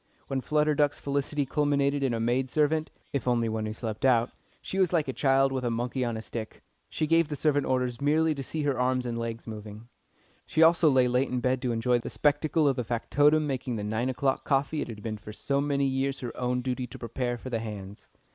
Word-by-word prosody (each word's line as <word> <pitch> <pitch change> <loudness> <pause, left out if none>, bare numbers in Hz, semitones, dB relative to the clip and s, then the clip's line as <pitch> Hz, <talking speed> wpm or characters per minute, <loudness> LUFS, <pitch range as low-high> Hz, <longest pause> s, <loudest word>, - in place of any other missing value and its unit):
When 135 -1 -1
Flutter 150 +2 +2
Duck's 145 -1 +1
felicity 140 +1 -1
culminated 145 0 +1
in 135 -2 +1
a - - -2
maid 125 +3 0
servant 155 +2 +1 0.2
(if 140 -2 -2
only 120 -2 +2
one 110 -1 -2
who 110 - -4
slept 110 -1 -5
out), 120 -2 +3 0.3
she 195 - -4
was 185 -3 +3
like 160 -5 +1
a 130 - -2
child 135 0 +3
with 130 -1 -2
a 120 - 0
monkey 120 +3 -2
on 120 -2 -2
a 110 - -6
stick. 110 -2 -7 0.3
She 155 - -1
gave 165 +1 +3
the 150 - -4
servant 145 -1 +1
orders 125 -1 -1
merely 155 +2 +3
to 140 - -5
see 150 +3 -3
her 140 -3 0
arms 125 0 +1
and 120 -1 -3
legs 115 0 -4
moving. 110 +1 -9 0.6
She 160 - +3
also 165 -1 +6
lay 130 -2 +4
late 125 +2 +1
in 125 - -1
bed 125 +1 0
to 125 - -1
enjoy 120 +2 +1
the - - -6
spectacle 150 +1 +2
of 135 -2 +2
the 125 - 0
factotum 145 +6 +2
making 130 -3 -2
the 105 - -3
nine 110 +4 -1
o'clock 135 +1 0
coffee 145 +2 0
it - - -3
had 105 -3 -8
been 110 -2 -4
for 105 - -9
so 140 +6 -1
many 140 -1 +1
years 135 0 -1
her 120 -2 -5
own 125 0 -1
duty 125 -1 -2
to 115 - -10
prepare 120 +1 -3
for 130 +2 -8
the 115 - 0
"hands." 105 -2 -8
130 Hz, 235 wpm, -28 LUFS, 120-145 Hz, 0.6 s, also